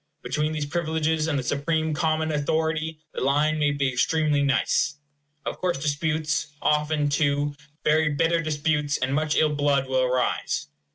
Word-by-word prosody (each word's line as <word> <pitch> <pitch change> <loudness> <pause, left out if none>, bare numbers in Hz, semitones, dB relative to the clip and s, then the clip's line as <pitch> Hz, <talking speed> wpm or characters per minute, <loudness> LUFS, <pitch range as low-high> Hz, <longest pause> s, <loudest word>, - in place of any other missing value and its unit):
Between 150 +1 -1
these 155 -2 -2
privileges 160 0 0
and 150 -3 0
the 130 - -2
supreme 155 +4 0
common 155 0 0
authority 160 +2 -1 0.2
the - - -4
line 150 +3 +2
may 145 -1 +3
be 140 -1 0
extremely 150 +3 +1
nice. 140 +2 +1 0.5
Of - - -4
course 180 -5 0
disputes, 150 +2 -1
often, 150 0 +1
too, 145 0 +1 0.3
very 155 0 +3
bitter 165 +3 +1
disputes, 150 -1 0
and 130 +1 -1
much 150 +1 +1
ill 155 -1 +3
blood, 145 -2 +1
will 130 0 +1
arise. 125 - 0
150 Hz, 155 wpm, -25 LUFS, 145-155 Hz, 0.5 s, may